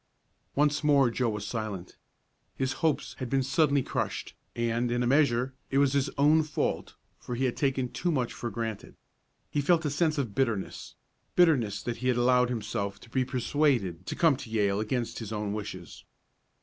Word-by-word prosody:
Once 150 +1 +2
more 140 -4 +4
Joe 120 0 0
was 105 -1 -4
silent. 105 -6 -5 0.6
His 130 0 -1
hopes 160 -2 +1
had 130 -2 -4
been 135 +1 +2
suddenly 140 0 +2
crushed, - - -3 0.2
and, 120 +1 0
in 120 +1 0
a - - +1
measure, 130 -1 +3 0.2
it 135 - 0
was 140 -1 +4
his 140 0 +1
own 150 +3 +5
fault, 155 -2 -2 0.2
for 125 - -5
he 130 +2 0
had 125 - 0
taken 135 -2 0
too 175 +7 -2
much 130 -6 -1
for 120 - -4
granted. 110 -1 -5 0.6
He 145 - +1
felt 160 +2 +3
a 145 - 0
sense 155 +1 +1
of 125 -8 -2
bitterness 115 -5 -2 0.4
bitterness 125 - +3
that 120 0 -3
he 125 - -3
had 125 -1 +2
allowed 125 0 +4
himself 100 -4 -3
to 115 - -15
be 130 0 +2
persuaded 125 - 0
to - - -3
come 165 -4 +4
to 120 - -9
Yale 100 -2 +1
against 115 +2 -2
his 110 -2 -6
own 105 -2 -2
wishes. 95 -5 -7
125 Hz, 185 wpm, -29 LUFS, 110-140 Hz, 0.6 s, own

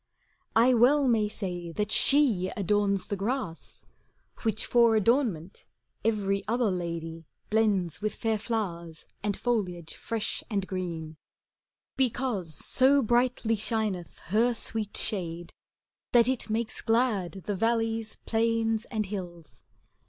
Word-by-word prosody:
I 240 +3 +5
well 265 +4 +4
may 220 -4 +2
say 175 -5 -5
that 210 +4 -2
she 235 -8 +4
adorns 200 -1 +1
the 205 - -3
grass, 205 -4 -4 0.6
Which 220 -2 0
for 235 -2 +4
adornment 215 - 0 0.4
every 200 -3 0
other 235 -1 +1
lady 165 -2 -5 0.2
Blends 195 -8 +1
with 215 0 -2
fair 225 -2 -1
flowers 170 -8 -4 0.2
and 205 -1 -2
foliage 180 -9 -2
fresh 225 -2 -3
and 200 -4 -1
green; 170 -5 -5 0.8
Because 235 - -1
so 270 +1 +3
brightly 240 0 +1
shineth 215 -5 -2 0.2
her 235 +3 +3
sweet 220 -2 -1
shade. 175 -4 -1 0.6
That 235 -1 +6
it 260 -3 -1
makes 225 +2 -2
glad 215 -6 0
the 205 - -2
valleys, 225 +1 0
plains, 225 0 +1
and 215 -3 -2
hills. 175 -5 -8
215 Hz, 120 wpm, -28 LUFS, 185-230 Hz, 0.8 s, That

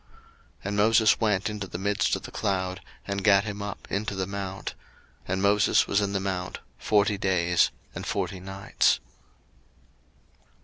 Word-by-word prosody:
02:024:018 - - -33 0.5
And 100 +1 -2
Moses 110 +1 +5
went 105 -2 +2
into 105 -2 -5
the 85 - -6
midst 100 +2 +1
of - - -6
the - - -8
cloud, 95 -1 -2 0.2
and 100 -1 -3
gat 100 -2 +5
him 105 -1 -5
up 100 -1 -6
into 100 0 -2
the 95 -1 -1
mount: 95 0 -5 0.5
and 95 +2 -1
Moses 100 +1 +4
was 100 - +1
in 100 -1 -1
the 100 - +1
mount 95 -2 -3 0.2
forty 105 -1 +2
days 90 -3 +3 0.2
and - - -6
forty 95 - -2
nights. 95 +2 +1
100 Hz, 160 wpm, -27 LUFS, 95-105 Hz, 0.5 s, Moses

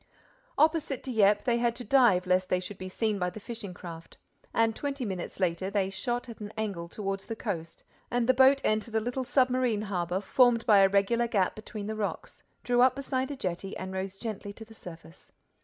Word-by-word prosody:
Opposite 310 -4 +2
Dieppe, 210 -5 +3
they 235 -1 +2
had 235 -1 +1
to 245 - -6
dive 240 -10 +4
lest 185 0 +2
they 180 - +2
should 185 +2 -8
be 185 - -6
seen 215 +1 -1
by 180 0 0
the 180 - -9
fishing 220 -3 -7
craft. 170 -2 -10 0.3
And 225 -1 +2
twenty 280 -3 -3
minutes 190 -3 -5
later, 185 0 0
they 195 -1 0
shot 240 +4 -3
at 230 - -9
an 210 -1 -7
angle 200 -6 -3
toward 195 0 -3
the 225 +3 -6
coast 170 -8 -5 0.3
and 240 -1 0
the 255 - +6
boat 265 +2 +5
entered 215 +1 0
a - - +4
little 245 +4 -2
submarine 250 -4 +2
harbor 180 -3 -1
formed 235 +3 +3
by 210 -3 +6
a 195 0 +6
regular 200 +5 +2
gap 200 -5 +1
between 215 -1 -7
the 215 +1 -3
rocks, 210 -2 -4 0.2
drew 245 0 +2
up 255 0 +5
beside 265 -1 -2
a 285 - -4
jetty 190 -4 -4
and 190 0 -6
rose 190 0 -4
gently 205 -1 -5
to 220 - -11
the 225 - -15
surface. 170 -5 -13
215 Hz, 205 wpm, -29 LUFS, 190-245 Hz, 0.3 s, the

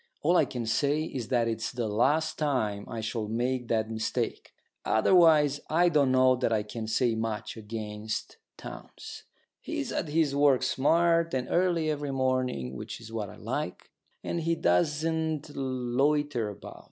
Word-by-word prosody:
All 170 +4 +3
I - - +5
can 120 -3 -5
say 145 +6 +1
is 130 -8 -5
that 120 -3 +1
it's 115 -1 -2
the 120 -2 -2
last 140 +10 +1
time 110 -9 -1
I 115 -2 -4
shall 110 0 -3
make 125 +3 -1
that 110 -1 0
mistake. 110 0 -3 0.3
Otherwise 150 +2 +4
I 175 +3 +4
don't 145 -5 +3
know 130 0 +5
that 120 - 0
I 110 -2 +1
can 110 +1 -6
say 115 +2 +1
much 110 -1 -3
against 110 -1 -5 0.2
Townes. - - -10 0.3
He's - - -4
at - - -2
his 150 -2 +1
work 140 -3 +4
smart 165 +4 +2
and 125 -1 -2
early 175 -3 +2
every 145 -1 -3
morning, 130 - -1
which - - -7
is 115 -1 -11
what 105 -3 -3
I - - -11
like; - - -5 0.3
and 170 - -2
he 165 +1 +1
doesn't 155 - 0
loiter 130 -1 0
about. 100 - -10
130 Hz, 160 wpm, -28 LUFS, 110-150 Hz, 0.3 s, I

